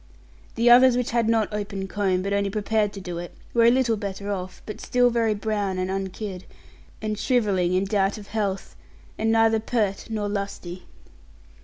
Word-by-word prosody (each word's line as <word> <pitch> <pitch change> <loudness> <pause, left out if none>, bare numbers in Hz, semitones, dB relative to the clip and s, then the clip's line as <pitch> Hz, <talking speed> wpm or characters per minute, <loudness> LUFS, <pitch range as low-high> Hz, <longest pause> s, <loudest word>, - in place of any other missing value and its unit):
The 235 +1 +1
others 245 +1 +7
which 250 - -1
had 230 -1 +1
not 220 -2 +1
opened 200 -2 -4
comb, 190 -3 0
but 200 +1 -1
only 200 0 +1
prepared 210 0 0
to 195 - -7
do 175 -3 -5
it, 175 0 -8 0.2
were 235 -1 +4
a - - +8
little 245 -2 +2
better 200 0 -4
off, 185 -2 -5
but 210 - -7
still 245 0 +2
very 225 -2 +1
brown 205 -3 -2
and 185 +1 -2
unkid, 190 0 -5 0.6
and 215 -1 -2
shrivelling 200 -8 +1
in 190 +1 +1
doubt 195 +1 +1
of 205 -1 -11
health, 200 -3 -3 0.4
and 225 0 +1
neither 225 0 +4
peart 215 -3 -1
nor 215 -2 -2
lusty. 200 -3 -5
205 Hz, 180 wpm, -24 LUFS, 195-225 Hz, 0.6 s, a